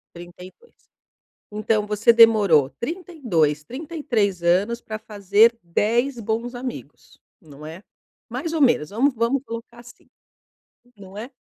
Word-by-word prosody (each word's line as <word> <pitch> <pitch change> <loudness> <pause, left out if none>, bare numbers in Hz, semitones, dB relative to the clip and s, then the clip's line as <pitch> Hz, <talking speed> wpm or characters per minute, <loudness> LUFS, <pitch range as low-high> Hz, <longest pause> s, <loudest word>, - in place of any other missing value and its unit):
32. 180 - -14 0.8
Então 210 0 -1
você 210 +2 +3
demorou 210 - +5
32, 235 - -1
33 240 - -3
anos 195 +7 +1
para 215 -1 -7
fazer 210 +3 +2
10 235 +9 0
bons 230 +3 -3
amigos, 250 0 -9 0.2
não 150 -2 -13
é? 165 +5 -10 0.5
Mais 330 -1 -4
ou 320 - -1
menos, 240 - +3
vamos 255 +7 +1
vamos 235 +4 0
colocar 230 0 -9
assim, 240 0 -16 0.9
não 195 0 -13
é? 235 +6 -7
220 Hz, 120 wpm, -22 LUFS, 185-245 Hz, 0.9 s, demorou